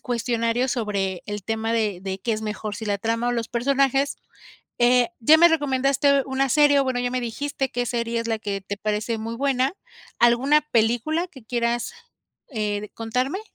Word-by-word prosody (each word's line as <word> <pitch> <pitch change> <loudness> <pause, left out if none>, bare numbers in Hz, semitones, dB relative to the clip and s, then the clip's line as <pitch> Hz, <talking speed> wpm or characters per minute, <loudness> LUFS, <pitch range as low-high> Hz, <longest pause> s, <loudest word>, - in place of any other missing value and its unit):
cuestionarios 240 0 -1
sobre 200 -6 -2
el 205 -2 -5
tema 225 0 -2
de 215 -5 0
de 190 0 -4
qué 230 +3 -1
es 215 - -3
mejor, 215 0 -4
si 225 - -6
la 205 -1 0
trama 230 +3 -1
o - - +1
los 230 -2 -2
personajes, 275 +3 +1 0.6
eh, 245 0 +4
ya 300 +8 +7
me 340 +1 +8
recomendaste 280 -2 +2
una 270 0 0
serie, 290 +1 +5
o - - +1
bueno, 255 -2 -1
ya 245 0 -1
me 255 0 -1
dijiste 270 +3 -3
qué 245 -1 -1
serie 235 -1 -1
es 230 - -5
la 225 -1 0
que 200 -2 -4
te 200 +1 -6
parece 215 +2 -2
muy 225 +1 -5
buena. 270 +2 +1 0.4
¿Alguna 255 +6 +4
película 240 +9 +1
que 265 -8 -15
quieras, 235 0 -1 0.6
eh, 210 -4 -3
contarme? 250 - -2
240 Hz, 180 wpm, -23 LUFS, 220-270 Hz, 0.6 s, me